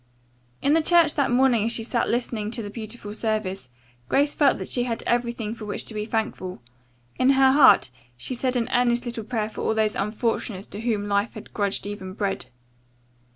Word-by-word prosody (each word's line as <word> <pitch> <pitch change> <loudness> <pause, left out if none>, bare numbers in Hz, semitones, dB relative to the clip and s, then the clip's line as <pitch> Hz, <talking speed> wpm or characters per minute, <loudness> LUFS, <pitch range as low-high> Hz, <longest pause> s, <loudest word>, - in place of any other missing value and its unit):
In 280 - +4
church 330 -1 +4
that 280 -3 +1
morning 245 -3 +3
as 230 - +1
she 230 - +1
sat 235 +1 0
listening 230 -3 -1
to 230 0 -2
the 205 - -6
beautiful 215 -1 -7
service, 215 - -2 0.4
Grace 285 +1 +2
felt 285 -3 +3
that - - -6
she 245 -1 0
had 230 -2 -3
everything 235 -2 -1
for 225 -2 -8
which 205 - -4
to - - -3
be 210 0 -3
thankful. 215 - -3 0.6
In 255 - +4
her 265 0 +6
heart 270 - +6 0.3
she 185 - -4
said 255 +1 -1
an 235 -2 0
earnest 245 0 +2
little 235 -2 -4
prayer 220 -1 -2
for 220 - -7
all 220 - 0
those 215 -1 +1
unfortunates 210 -1 -2
to 205 - -7
whom 215 -3 -1
life 200 +2 0
had 215 - -10
grudged 200 -2 -1
even 195 -2 -6
bread. 195 -8 -3
225 Hz, 195 wpm, -24 LUFS, 210-245 Hz, 0.6 s, her